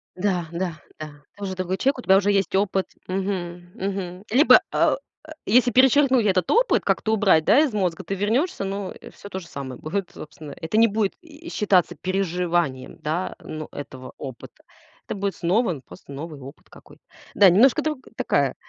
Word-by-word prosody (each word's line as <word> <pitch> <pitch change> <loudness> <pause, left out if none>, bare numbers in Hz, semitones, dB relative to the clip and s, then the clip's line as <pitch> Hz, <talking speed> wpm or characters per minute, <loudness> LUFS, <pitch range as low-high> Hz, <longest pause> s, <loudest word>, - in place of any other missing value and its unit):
Да, 180 -3 -1
да, 170 -2 -3 0.2
да, 155 - -5 0.3
ты - - -39
тоже 195 -2 -5
другой 185 0 -2
человек, 270 +2 +1
у - - -4
тебя 190 -4 +5
уже 205 +1 +2
есть 195 -1 +1
опыт, 195 -1 +1 0.2
мгм, 180 -2 -4
мгм, 190 -1 -4
либо, 275 +8 +7
а, - - +3 0.3
э, - - -12
если 245 +3 +4
перечеркнуть 260 -1 +4
этот 185 -4 +1
опыт, - - +3
как-то 220 - 0
убрать, 190 -7 +3
да, 275 - +6
из 295 -7 +2
мозга, 185 -3 -1
ты 195 +3 -3
вернешься, 230 - 0
но 195 0 -4 0.2
всё 200 - -12
то 190 - -5
же 170 - -12
самое 135 -4 -7
будет, 190 +4 -4
собственно, 150 -1 -10
это 165 +6 -2
не 230 +1 +6
будет 205 -1 0
и 330 0 -12
считаться 185 -5 +2
переживанием, 175 -6 -1
да, 160 +5 -2
ну, 155 -1 -7
этого 130 -2 -9
опыта. 130 -4 -10 0.4
Это - - -4
будет 200 -1 -2
снова 190 +4 +1
н 145 - -6
просто - - -14
новый 150 +1 -7
опыт 135 +4 -13
какой-то. - - -17 0.3
Да, 195 -3 +7
немножко 250 - +5
друг 305 -3 -2 0.2
такая, - - +1
190 Hz, 185 wpm, -23 LUFS, 170-215 Hz, 0.4 s, либо